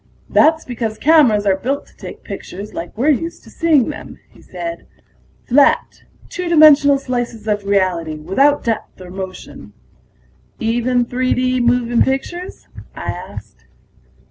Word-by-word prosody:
"That's 320 +1 +3
because 225 -3 -4
cameras 260 -10 +4
are 195 -1 +3
built 265 +9 -3
to - - -24
take - - -10
pictures 200 +3 -8
like 170 +5 -7
we're 275 +7 +3
used 330 +4 -3
to - - -16
seeing 310 -7 +2
them," 300 - -8
he - - -19
said. 335 0 -7 0.6
"Flat, 280 +3 +2 0.2
two 360 -2 -5
dimensional 300 -3 +6
slices 245 -4 -4
of 205 -1 -1
reality, 185 -5 0
without 230 - +1
depth 225 -4 -3
or 180 -1 -11
motion." 190 0 -9 0.9
"Even 240 +1 0
3 255 +1 -1
D 255 0 0
moving 240 0 +2
pictures?" 310 +7 -3 0.3
I - - -4
asked. - - -11
245 Hz, 140 wpm, -18 LUFS, 210-290 Hz, 0.9 s, dimensional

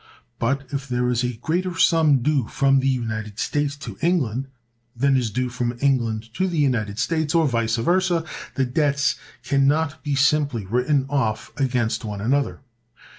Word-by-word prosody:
But, 135 +3 -1
if 140 0 -3
there 125 -1 0
is 120 0 0
a 125 0 -1
greater 170 +9 -2
sum 155 -7 +4
due 140 -5 +1
from 135 -1 +3
the 135 - 0
United 110 -5 -3
States 145 +2 -1
to 145 - -9
England 135 -7 0 0.5
than 135 +3 +2
is 125 -3 +1
due 125 +5 -1
from 120 0 -3
England 115 -5 0
to 190 - 0
the 175 -3 -3
United 115 -8 0
States, 160 +5 0
or 165 -2 +4
vice 115 -3 0
versa, 175 +6 +1 0.3
the 135 - +1
debts 140 +2 +1 0.3
can 140 -1 +2
not 150 -1 0
be 145 -1 -1
simply 140 -5 +2
written 125 +6 +1
off 120 -6 -1
against 125 -4 0
one 105 -2 -5
another. 135 +8 0
135 Hz, 170 wpm, -23 LUFS, 120-145 Hz, 0.5 s, sum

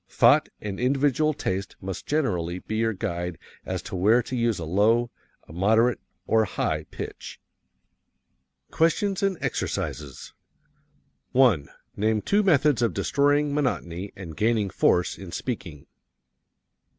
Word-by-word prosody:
Thought - - +4
and 100 -2 -5
individual 140 +4 +2
taste 95 -6 -3
must 95 -1 -6
generally 90 - 0
be 110 +4 -5
your 115 0 +1
guide 85 -2 -4 0.3
as - - -3
to - - -6
where 110 +7 +4
to 130 - -5
use 115 -3 +1
a 85 - -5
low, 110 +8 +2 0.4
a - - -12
moderate, 110 +7 +3 0.3
or 110 - +3
a - - +2
high - - -2
pitch. - - -8 1.3
QUESTIONS 190 +4 +1
AND 195 -2 +1
EXERCISES 70 -3 -4 1.0
1. 120 - +4 0.3
Name 110 +1 +1
two 205 - +2
methods 150 - +3
of 115 - +1
destroying 145 0 +2
monotony 100 - -2
and 85 -5 -8
gaining 110 -1 +1
force 90 0 +2
in 95 -3 -9
speaking. 90 - -5
110 Hz, 130 wpm, -25 LUFS, 90-135 Hz, 1.3 s, Thought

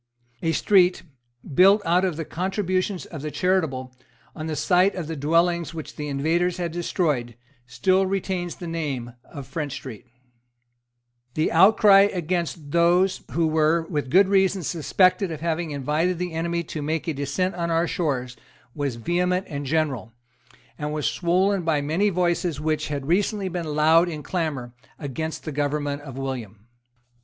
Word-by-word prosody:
A 165 - +1
street, 180 +1 +3 0.5
built 195 +7 +6
out 175 +2 +3
of 180 -5 -1
the 165 - -4
contributions 185 +1 -2
of 155 -5 -8
the 155 - -4
charitable, 145 -6 -1 0.4
on 155 -1 -5
the 155 - -2
site 180 +6 +3
of 180 -4 -4
the 160 +1 -5
dwellings 165 +3 +1
which 160 - -7
the 150 -1 -5
invaders 165 +6 0
had 175 -2 -2
destroyed, 155 - -1 0.3
still 185 +11 +2
retains 185 -2 -2
the 175 - -8
name 145 -8 -4
of 140 -2 -9
French 145 +1 -4
Street, 130 -4 -9 1.3
The 155 - +1
outcry 195 +2 +6
against 170 -4 -3
those 175 +3 +3
who 165 0 +2
were, 160 +1 +2
with 145 -4 -2
good 190 +7 +5
reason, 190 -1 +2
suspected 180 +5 +2
of 155 -2 -6
having 170 0 -1
invited 150 +5 0
the 180 -1 -4
enemy 170 +1 -1
to 155 -1 -6
make 155 +2 -2
a 160 - 0
descent 165 +7 -1
on 170 -1 -3
our 165 +1 +2
shores 130 -8 -2 0.4
was 140 -4 -2
vehement 180 - 0
and 145 -2 -5
general, 135 -7 -1 0.7
and 150 0 -3
was 150 -1 -2
swollen 185 +3 +1
by 160 -3 +1
many 160 +9 +1
voices 175 -4 0
which 155 0 -1
had 140 -2 -4
recently 195 +4 0
been 165 -4 -4
loud 160 +3 +5
in 155 -3 -6
clamour 145 -9 -3 0.2
against 160 +2 -5
the 155 - -5
government 145 0 -2
of 135 -3 -9
William. 115 -6 -5
165 Hz, 160 wpm, -24 LUFS, 145-180 Hz, 1.3 s, built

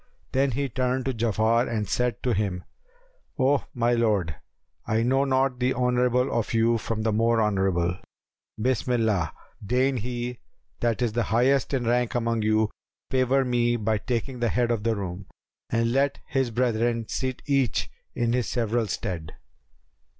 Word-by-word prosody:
Then 135 0 +2
he 140 +3 -1
turned 130 +1 -1
to 135 - 0
Ja'afar 115 +1 +1
and 110 -3 -2
said 125 -1 -1
to 125 - +1
him 95 -3 -1 0.7
"O 135 0 +2
my 120 0 +2
lord, 105 -9 +1 0.5
I 110 +1 +1
know 135 +3 +2
not 130 -1 +1
the 125 +1 +1
honourable 125 0 +2
of 115 0 -1
you 115 +1 +3
from 110 0 -3
the 110 - +1
more 115 +1 +2
honourable: 95 -4 +1 0.6
Bismillah! 110 - +1 0.3
deign 130 +5 +1
he 120 +1 -4 0.4
that 120 +1 0
is 115 -2 -1
highest 120 +3 +2
in 125 -2 -1
rank 120 +1 +1
among 115 -1 0
you 110 0 +2 0.4
favour 130 +1 +2
me 120 -1 +2
by 110 -1 0
taking 125 +2 -3
the 120 -1 +1
head 120 0 +1
of 115 -3 0
the 115 +1 +1
room, 95 -1 -5 0.4
and 115 0 +1
let 135 +2 +2
his 135 -2 0
brethren 115 -1 0
sit 130 -1 -3
each 140 -4 +1 0.3
in 120 0 +1
his 125 -3 0
several 115 -1 0
stead." 85 -5 -4
120 Hz, 155 wpm, -26 LUFS, 110-125 Hz, 0.7 s, you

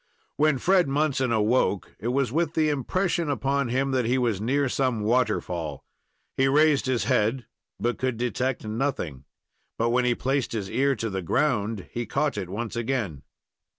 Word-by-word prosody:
Then 150 -2 +4
Fred 180 +5 +3
Munson 135 -3 +1
awoke, 110 -2 +1
it 115 - -4
was 130 0 +1
with 165 +2 0
the 155 -1 +3
impression 170 +4 0
upon 140 -1 0
him 135 +3 0
that 130 -2 +1
he 125 +3 +2
was 115 -6 0
near 140 +5 +1
some 125 -3 0
waterfall. 105 - -1 0.5
He 135 - +4
raised 145 0 +4
his 130 -3 +1
head, 115 +4 +1 0.3
but 120 +1 -1
could 130 -3 -1
detect 125 +1 -1
nothing; 110 - -3 0.5
but 115 +1 +1
when 125 +1 +2
he 120 -1 +2
placed 135 0 -1
his 100 -4 -3
ear 140 +1 +2
to 115 -3 -3
the 95 0 -2
ground, 105 - 0
he 120 -1 -4
caught 145 +4 0
it 95 -4 -4
once 110 +4 -4
again. 115 - -2
125 Hz, 170 wpm, -26 LUFS, 110-140 Hz, 0.5 s, Then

